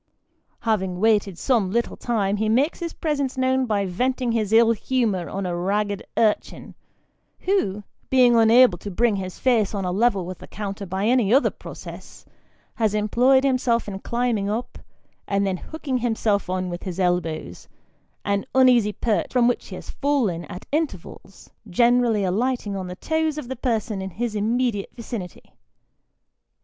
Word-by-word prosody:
Having 190 Hz, -5 st, -1 dB
waited 205 Hz, -4 st, +2 dB
some 230 Hz, -6 st, +1 dB
little 235 Hz, +4 st, -1 dB
time, 210 Hz, -4 st, -1 dB
he 215 Hz, +1 st, 0 dB
makes 270 Hz, +8 st, +2 dB
his 340 Hz, -2 st, -4 dB
presence 285 Hz, -6 st, -2 dB
known 260 Hz, 0 st, +1 dB
by 205 Hz, -3 st, 0 dB
venting 250 Hz, +6 st, -1 dB
his 215 Hz, -3 st, -1 dB
ill 225 Hz, +1 st, +6 dB
huciour 220 Hz, -6 st, -1 dB
on 195 Hz, 0 st, -3 dB
a 175 Hz, -1 st, -2 dB
ragged 200 Hz, +3 st, -1 dB, 0.2 s
urchin, 220 Hz, -2 st, 0 dB, 0.7 s
who, 210 Hz, -, 0 dB, 0.3 s
being 250 Hz, -2 st, +5 dB
unable 230 Hz, -4 st, +6 dB
to 205 Hz, -, -6 dB
bring 215 Hz, +2 st, +1 dB
his 185 Hz, -1 st, -6 dB
face 225 Hz, -5 st, +1 dB
on 195 Hz, -2 st, -2 dB
a 180 Hz, -, -1 dB
level 200 Hz, -2 st, +1 dB
with 185 Hz, 0 st, -7 dB
the -, -, -11 dB
counter 200 Hz, -1 st, -6 dB
by 190 Hz, +3 st, -2 dB
any 235 Hz, -3 st, +3 dB
other 270 Hz, +4 st, +4 dB
process, -, -, -11 dB, 0.5 s
has 220 Hz, -3 st, 0 dB
employed 245 Hz, +5 st, +3 dB
himself 255 Hz, -4 st, +1 dB
in 195 Hz, -2 st, -5 dB
climbing 235 Hz, -3 st, -1 dB
up, 225 Hz, +4 st, -4 dB, 0.5 s
and 200 Hz, 0 st, +1 dB
then 190 Hz, -2 st, -1 dB
hooking 280 Hz, -, -4 dB
himself 220 Hz, -5 st, 0 dB
on 185 Hz, -1 st, -2 dB
with 175 Hz, -, -5 dB
his 185 Hz, -1 st, -6 dB
elbows 165 Hz, -, -2 dB, 0.6 s
an 200 Hz, 0 st, 0 dB
uneasy 245 Hz, -5 st, +5 dB
perch, 220 Hz, -1 st, -1 dB
from 245 Hz, -2 st, +3 dB
which 245 Hz, -, -1 dB
he -, -, -8 dB
has -, -, -9 dB
fallen 250 Hz, -, 0 dB
at 180 Hz, -, -9 dB
intervals, 275 Hz, -, -4 dB, 0.2 s
generally 235 Hz, +1 st, +3 dB
alighting 210 Hz, +2 st, -1 dB
on 190 Hz, -1 st, -4 dB
the 180 Hz, -, -6 dB
toes 315 Hz, -, -1 dB
of 300 Hz, -, -5 dB
the 260 Hz, -, -4 dB
person 225 Hz, -5 st, -2 dB
in 190 Hz, -, -4 dB
his 220 Hz, +5 st, -3 dB
immediate 220 Hz, 0 st, 0 dB
vicinity. 225 Hz, -6 st, -8 dB
220 Hz, 160 wpm, -23 LUFS, 195-250 Hz, 0.7 s, ill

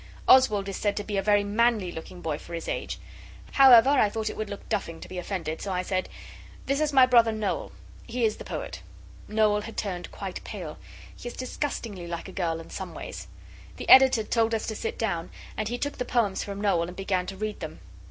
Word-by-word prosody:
Oswald 215 Hz, -7 st, +6 dB
is 195 Hz, -, -4 dB
said 205 Hz, -1 st, 0 dB
to 205 Hz, -, -1 dB
be 205 Hz, -, -4 dB
a -, -, +2 dB
very 205 Hz, +1 st, +3 dB
manly 210 Hz, -2 st, +2 dB
looking 175 Hz, +2 st, -9 dB
boy 155 Hz, -3 st, -2 dB
for 170 Hz, -, -8 dB
his 165 Hz, -, -6 dB
age. -, -, -3 dB, 0.5 s
However, 265 Hz, -1 st, +8 dB
I 260 Hz, -7 st, +4 dB
thought 220 Hz, +1 st, -2 dB
it -, -, -9 dB
would 215 Hz, -1 st, -4 dB
look 200 Hz, -, -8 dB
duffing 165 Hz, -6 st, -2 dB
to -, -, -9 dB
be 185 Hz, -, -5 dB
offended, 170 Hz, -4 st, -4 dB
so 200 Hz, -, -3 dB
I 180 Hz, 0 st, -1 dB
said 185 Hz, 0 st, -2 dB, 0.6 s
'This 275 Hz, +2 st, 0 dB
is 305 Hz, -1 st, +1 dB
my 265 Hz, -2 st, +7 dB
brother 235 Hz, -3 st, +5 dB
Noel. 215 Hz, -3 st, -2 dB, 0.4 s
He 240 Hz, 0 st, 0 dB
is 215 Hz, -, 0 dB
the -, -, -8 dB
poet.' -, -, -6 dB, 0.5 s
Noel 210 Hz, -1 st, +2 dB
had 225 Hz, +1 st, -9 dB
turned 180 Hz, -4 st, -3 dB
quite -, -, -6 dB
pale. -, -, -7 dB, 0.4 s
He -, -, -9 dB
is 240 Hz, -, -6 dB
disgustingly 235 Hz, -8 st, -4 dB
like 170 Hz, +1 st, -5 dB
a -, -, -8 dB
girl 170 Hz, -4 st, -1 dB
in 165 Hz, -, -11 dB
some -, -, -6 dB
ways. -, -, -7 dB, 0.5 s
The -, -, -7 dB
Editor 260 Hz, -4 st, +8 dB
told 225 Hz, +1 st, +1 dB
us 220 Hz, -, -2 dB
to 220 Hz, -, -4 dB
sit 225 Hz, -, -4 dB
down, 175 Hz, -7 st, -2 dB, 0.3 s
and 215 Hz, -, -2 dB
he 240 Hz, +2 st, -2 dB
took 285 Hz, +2 st, -3 dB
the -, -, +1 dB
poems 230 Hz, -6 st, 0 dB
from 200 Hz, -1 st, -6 dB
Noel, 175 Hz, -5 st, +2 dB
and 180 Hz, -, -8 dB
began 185 Hz, -2 st, -1 dB
to 195 Hz, -, -6 dB
read 215 Hz, +1 st, -3 dB
them. -, -, -7 dB
210 Hz, 225 wpm, -27 LUFS, 185-230 Hz, 0.6 s, However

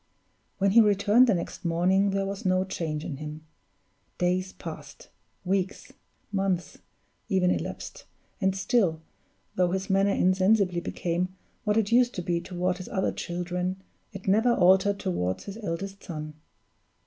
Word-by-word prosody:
When 195 Hz, 0 st, +2 dB
he 230 Hz, +3 st, +8 dB
returned 210 Hz, +4 st, +5 dB
the 220 Hz, -, +3 dB
next 170 Hz, -, -5 dB
morning 185 Hz, +4 st, +2 dB
there 195 Hz, 0 st, 0 dB
was 195 Hz, 0 st, -5 dB
no 185 Hz, 0 st, +2 dB
change 160 Hz, -5 st, -3 dB
in 140 Hz, -, -5 dB
him. 155 Hz, +1 st, -8 dB, 0.7 s
Days 185 Hz, +1 st, 0 dB
passed -, -, -10 dB, 0.4 s
weeks, 190 Hz, +1 st, -2 dB, 0.4 s
months, 195 Hz, -3 st, -1 dB, 0.5 s
even 185 Hz, -3 st, +3 dB
elapsed, -, -, -5 dB, 0.4 s
and 190 Hz, -1 st, +2 dB
still, 195 Hz, -5 st, +1 dB, 0.5 s
though 180 Hz, -1 st, +2 dB
his 190 Hz, +2 st, -2 dB
manner 195 Hz, +1 st, +3 dB
insensibly 185 Hz, -1 st, +3 dB
became 180 Hz, +2 st, -2 dB, 0.3 s
what 210 Hz, 0 st, +2 dB
it 220 Hz, -1 st, +1 dB
used 245 Hz, +1 st, +4 dB
to 180 Hz, -, -3 dB
be 170 Hz, -1 st, 0 dB
toward 180 Hz, 0 st, -2 dB
his 185 Hz, -, -8 dB
other 190 Hz, -, 0 dB
children, 180 Hz, +2 st, -3 dB, 0.3 s
it 195 Hz, -2 st, -9 dB
never 220 Hz, +5 st, +4 dB
altered 190 Hz, +2 st, +4 dB
toward 95 Hz, -, -2 dB
his 200 Hz, +1 st, -7 dB
eldest 195 Hz, -1 st, -5 dB
son. 155 Hz, -3 st, -6 dB
185 Hz, 145 wpm, -27 LUFS, 175-200 Hz, 0.7 s, he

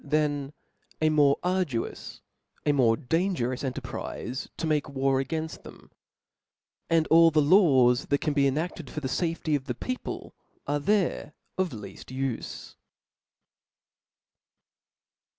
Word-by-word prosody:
^^ -, -, -12 dB, 0.9 s
^^^" 155 Hz, -, +4 dB
^ -, -, 0 dB
more 145 Hz, -2 st, +4 dB
arduous, 180 Hz, -10 st, -2 dB, 0.4 s
a 150 Hz, -, +4 dB
more 120 Hz, -5 st, +3 dB
dangerous 155 Hz, -4 st, -1 dB
enter 135 Hz, 0 st, -3 dB
prize, 125 Hz, +1 st, -5 dB
to -, -, -2 dB
make 155 Hz, -2 st, 0 dB
war 135 Hz, -1 st, +1 dB
againft 160 Hz, +3 st, -4 dB
them; -, -, -14 dB, 1.0 s
and 165 Hz, -1 st, +3 dB
all 165 Hz, 0 st, +7 dB
the 155 Hz, -1 st, +2 dB
laws 145 Hz, -7 st, +5 dB
that 140 Hz, -, +2 dB
can 150 Hz, -, -1 dB
be 140 Hz, -1 st, +3 dB
ena<5led 155 Hz, 0 st, -3 dB
for 150 Hz, -, -5 dB
the 140 Hz, -, -3 dB
fafety 165 Hz, +1 st, -1 dB
of 135 Hz, -2 st, -3 dB
the 125 Hz, -4 st, -3 dB
people 255 Hz, -, -5 dB, 0.3 s
are 145 Hz, +1 st, 0 dB
there 190 Hz, -3 st, 0 dB, 0.2 s
of 185 Hz, -3 st, 0 dB
lead 105 Hz, -3 st, -9 dB
ufe. 130 Hz, -2 st, -4 dB
145 Hz, 135 wpm, -27 LUFS, 130-165 Hz, 1.0 s, all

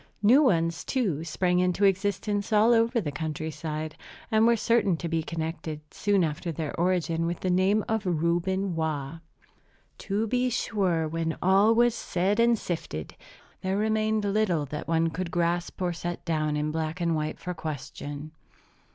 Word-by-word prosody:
New 245 Hz, +8 st, +7 dB
ones, 165 Hz, -, +2 dB
too, 195 Hz, -, -1 dB
sprang 180 Hz, +2 st, +1 dB
into 180 Hz, +2 st, +2 dB
existence 200 Hz, +2 st, 0 dB
all 220 Hz, +2 st, +5 dB
over 230 Hz, +1 st, +3 dB
the 155 Hz, -9 st, -3 dB
country 155 Hz, +1 st, -4 dB
side, 155 Hz, 0 st, -5 dB, 0.4 s
and 220 Hz, +1 st, +4 dB
were 235 Hz, -, +5 dB
certain 225 Hz, -6 st, +2 dB
to 170 Hz, -, -4 dB
be 165 Hz, -1 st, 0 dB
connected, 160 Hz, -1 st, -4 dB
soon 205 Hz, -3 st, +2 dB
after 160 Hz, +2 st, -2 dB
their 155 Hz, -1 st, -4 dB
origin, 170 Hz, -2 st, +1 dB
with 170 Hz, 0 st, -3 dB
the 185 Hz, -, 0 dB
name 190 Hz, +4 st, +2 dB
of 220 Hz, -1 st, 0 dB
Reuben 175 Hz, +2 st, 0 dB
Waugh. 155 Hz, -1 st, -2 dB, 0.8 s
To 205 Hz, +3 st, -1 dB
be 250 Hz, +3 st, +1 dB
sure, 190 Hz, -9 st, 0 dB
when 160 Hz, 0 st, -2 dB
all 195 Hz, +5 st, +4 dB
was 240 Hz, 0 st, +4 dB
said 195 Hz, 0 st, -1 dB
and 235 Hz, 0 st, +4 dB
sifted, 120 Hz, -, -5 dB, 0.5 s
there 190 Hz, +1 st, -1 dB
remained 215 Hz, 0 st, +1 dB
little 200 Hz, -7 st, +1 dB
that 150 Hz, +2 st, -6 dB
one 165 Hz, 0 st, +2 dB
could 180 Hz, +1 st, -3 dB
grasp 170 Hz, +1 st, -1 dB
or 175 Hz, -1 st, 0 dB
set 175 Hz, +1 st, -5 dB
down 155 Hz, -3 st, 0 dB
in 150 Hz, +1 st, -1 dB
black 160 Hz, +2 st, -3 dB
and 170 Hz, -1 st, +1 dB
white 155 Hz, 0 st, -2 dB
for 180 Hz, -, -5 dB
question. 145 Hz, -1 st, -6 dB
175 Hz, 165 wpm, -27 LUFS, 160-205 Hz, 0.8 s, New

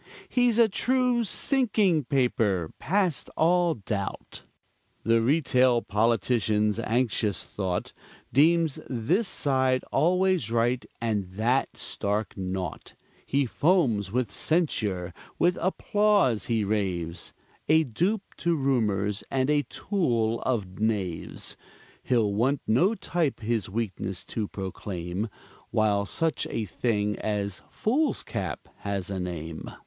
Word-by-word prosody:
He's 245 Hz, -3 st, +3 dB
a 230 Hz, -1 st, +6 dB
true 250 Hz, +3 st, +1 dB
sinking 210 Hz, -, +2 dB
paper, 110 Hz, -, +1 dB
past 185 Hz, -3 st, 0 dB
all 175 Hz, +1 st, +3 dB
doubt. 100 Hz, -2 st, -4 dB, 0.6 s
The 115 Hz, 0 st, +3 dB
retail 130 Hz, -2 st, +3 dB
politician's 105 Hz, 0 st, +1 dB
anxious 115 Hz, -2 st, 0 dB
thought 95 Hz, -3 st, -3 dB, 0.4 s
Deems 160 Hz, +1 st, +4 dB
this 145 Hz, -, +1 dB
side 130 Hz, -4 st, +1 dB
always 180 Hz, -, +2 dB
right, 120 Hz, +2 st, +1 dB, 0.2 s
and 110 Hz, -4 st, -1 dB
that 120 Hz, +6 st, 0 dB
stark 100 Hz, 0 st, -2 dB
naught; 95 Hz, -3 st, -5 dB, 0.3 s
He 140 Hz, 0 st, +2 dB
foams 125 Hz, -, +2 dB
with 120 Hz, -3 st, 0 dB
censure, 100 Hz, -, 0 dB, 0.2 s
with 175 Hz, +1 st, +3 dB
applause 195 Hz, -, +2 dB
he 115 Hz, -3 st, +1 dB
raves, 90 Hz, -5 st, -2 dB, 0.4 s
A 160 Hz, +1 st, +6 dB
dupe 180 Hz, -, 0 dB
to 170 Hz, -1 st, +1 dB
rumors, 105 Hz, -8 st, 0 dB
and 135 Hz, +1 st, +1 dB
a 150 Hz, -1 st, +3 dB
tool 120 Hz, -, 0 dB
of 105 Hz, -7 st, -2 dB
knaves: 100 Hz, -6 st, -2 dB, 0.5 s
He'll 110 Hz, -5 st, +1 dB
want 130 Hz, +7 st, +1 dB
no 180 Hz, -, +3 dB
type 165 Hz, -, -1 dB
his 110 Hz, -2 st, -1 dB
weakness 95 Hz, -3 st, -3 dB
to 110 Hz, -3 st, -1 dB
proclaim 95 Hz, +1 st, -4 dB, 0.4 s
While 105 Hz, -2 st, +1 dB
such 165 Hz, +5 st, -1 dB
a 115 Hz, -, -2 dB
thing 105 Hz, +1 st, -1 dB
as 100 Hz, -3 st, -2 dB
foolscap 275 Hz, +7 st, -1 dB
has 100 Hz, -1 st, -3 dB
a 95 Hz, -, -2 dB
name. 85 Hz, -3 st, -5 dB
115 Hz, 115 wpm, -27 LUFS, 100-160 Hz, 0.6 s, a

